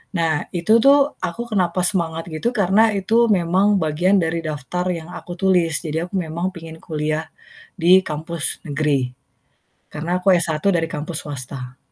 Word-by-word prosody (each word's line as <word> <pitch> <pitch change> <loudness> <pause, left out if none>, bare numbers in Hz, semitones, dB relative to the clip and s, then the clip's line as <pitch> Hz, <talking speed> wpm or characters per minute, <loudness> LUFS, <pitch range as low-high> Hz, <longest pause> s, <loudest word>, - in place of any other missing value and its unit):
Nah, 160 -3 0
itu 195 +7 +4
tuh 280 +3 +5
aku 175 +8 -4
kenapa 180 -3 +1
semangat 170 -3 0
gitu 235 +11 -2
karena 205 +2 +4
itu 225 +5 +2
memang 195 +1 +2
bagian 165 +6 +2
dari 165 +1 -1
daftar 155 +4 -3
yang 165 -1 -7
aku 175 0 -8
tulis. 180 -3 +2
Jadi 160 -1 -3
aku 195 - -8
memang 175 +1 -2
pingin 165 -1 -9
kuliah 155 0 -3 0.5
di 180 +1 +6
kampus 160 +1 -4
negeri. 145 -4 0 0.8
Karena 170 +4 -2
aku 190 +1 +3
S1 170 -3 +1 0.2
dari 165 -2 0
kampus 155 +1 -4
swasta. 130 -2 -6
170 Hz, 150 wpm, -21 LUFS, 155-185 Hz, 0.8 s, di